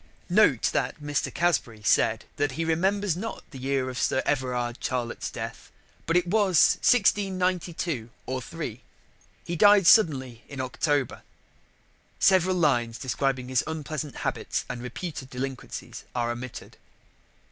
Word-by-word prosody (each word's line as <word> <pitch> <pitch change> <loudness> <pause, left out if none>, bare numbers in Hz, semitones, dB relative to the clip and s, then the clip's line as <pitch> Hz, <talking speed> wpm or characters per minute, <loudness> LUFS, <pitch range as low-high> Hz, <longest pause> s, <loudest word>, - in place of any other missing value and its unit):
"Note 175 - +4
that - - -1
Mr. 145 0 -2
Casbury 125 -11 0
said 110 +1 +2
that 145 -2 0
he 165 +5 -2
remembers 190 +3 +1
not 225 +6 -5
the 135 - -9
year 135 0 0
of 125 -1 -4
Sir 130 - +1
Everard 125 -3 -1
Charlett's 120 -2 -2
death, - - -7 0.4
but 165 +2 +3
it 180 - +2
was 190 -2 +4
1692 185 - +1 0.2
or 130 0 -3
3. 130 -5 -6 0.6
He 175 - -3
died 205 +2 +6
suddenly 130 - +4
in 140 - -8
October. 135 +1 -1 1.0
[Several 185 -1 +4
lines 120 -9 +1
describing 130 +1 -1
his 130 -2 +2
unpleasant 155 -2 -4
habits - - -2
and 125 -1 -5
reputed 130 +2 -6
delinquencies 130 0 -6
are 120 -1 0
omitted. 120 +1 -8
145 Hz, 130 wpm, -26 LUFS, 125-175 Hz, 1.0 s, died